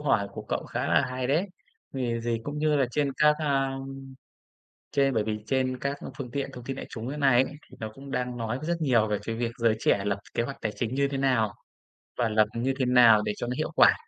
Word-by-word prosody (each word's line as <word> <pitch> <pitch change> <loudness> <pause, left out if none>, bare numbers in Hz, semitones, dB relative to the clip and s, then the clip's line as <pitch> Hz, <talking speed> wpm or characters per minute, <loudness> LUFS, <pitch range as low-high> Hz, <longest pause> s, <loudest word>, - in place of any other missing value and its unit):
hỏi 110 -9 +1
của - - -6
cậu - - -1
khá - - -3
là - - +4
hay 130 0 -2
đấy. 155 +9 +2 0.5
Vì 120 -3 -1
gì 115 0 -1
cũng 145 +1 -4
như 150 0 +2
là 135 -2 +3
trên 140 +2 0
các, 150 0 +5
a, 135 -3 0 1.2
trên 135 -2 +2
bởi 110 - +1
vì 105 0 -2
trên 130 +1 0
các 140 +1 -1 0.2
phương 130 -3 -5
tiện 140 +2 -3
thông 125 - -9
tin 135 +1 -4
đại - - -6
chúng 115 +1 -6
ấy 145 +2 -4
nay 135 -3 +5
ấy, - - -5 0.2
thì - - -15
nó 110 -1 -4
cũng 135 +2 -10
đang 125 -1 -2
nói 115 +1 -2
rất 150 - -8
rất 170 - +2
nhiều 125 -8 +3
về 105 -1 0
cái 115 - -3
việc 115 0 -1
giới 115 -2 +3
trẻ - - +3
là 100 - -5
lập 100 -1 0 0.2
kế 115 - +1
hoạch 135 +3 -5
tài 110 - -2
chính 120 +1 -2
như 140 +1 +2
thế 140 -1 -3
nào 125 -6 +2 0.6
và 120 -2 +1
lập 110 0 +4
như 130 +3 0
thế 130 - +2
nào 120 -4 +7
để 105 0 -1
cho 120 - -3
nó 125 - -1
hiệu - - -2
quả. - - +7
125 Hz, 260 wpm, -27 LUFS, 115-135 Hz, 1.2 s, nào